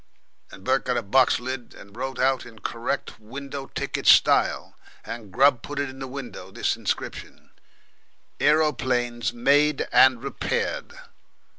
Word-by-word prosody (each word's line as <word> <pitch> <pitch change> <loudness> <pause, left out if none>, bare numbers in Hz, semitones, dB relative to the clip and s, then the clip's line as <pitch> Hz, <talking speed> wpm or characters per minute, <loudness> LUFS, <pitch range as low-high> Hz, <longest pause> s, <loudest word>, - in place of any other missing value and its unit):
And 95 - -13
Bert 130 +3 +1
got 125 -1 0
a 120 - -1
box 130 +6 +3
lid 125 -1 -6
and 100 +1 -14
wrote 130 +2 -4
out 130 0 +1
in 115 -2 -13
correct 115 +1 -4
window 135 +5 -7
ticket - - -4
style, - - +4 0.3
and 115 -4 -8
Grubb 130 +2 +4
put 145 - -8
in 135 -2 -3
the 135 - -5
window 135 -1 -8
this - - -1
inscription, - - -5 0.9
"Aeroplanes 125 -6 +1
made 145 +4 +2
and 130 -2 +5
repaired." 140 - -3
130 Hz, 135 wpm, -24 LUFS, 120-140 Hz, 0.9 s, and